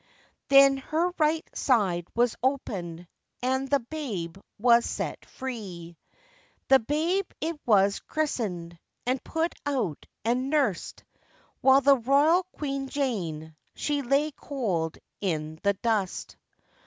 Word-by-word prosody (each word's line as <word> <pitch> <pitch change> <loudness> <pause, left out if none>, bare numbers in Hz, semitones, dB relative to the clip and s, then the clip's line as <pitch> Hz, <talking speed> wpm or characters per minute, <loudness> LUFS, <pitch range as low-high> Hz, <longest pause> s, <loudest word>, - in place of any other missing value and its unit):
Then 275 0 +7
her 320 +6 0
right 315 +1 +2
side 190 -9 +1
was 240 0 +2
opened, 180 -11 -2 0.4
And 265 +1 0
the 280 -2 +3
babe 225 - -5 0.2
was 235 +1 +5
set - - -4
free. 190 -10 -7 0.7
The 270 - +8
babe 325 - 0
it 320 -1 -3
was 200 -2 +4
christened, 185 - -3 0.3
And 255 +1 0
put 325 +1 -1
out 250 - -2 0.2
and 250 +3 +1
nursed, 275 - 0 0.6
While 270 +1 +6
the 280 0 +6
royal 285 +8 +4
Queen 275 -2 -4
Jane 170 - -3 0.2
She 290 -1 -1
lay 280 +4 +1
cold 195 - -2 0.2
in 160 -4 -2
the 200 0 +3
dust. 205 -2 -2
250 Hz, 115 wpm, -27 LUFS, 190-280 Hz, 0.7 s, The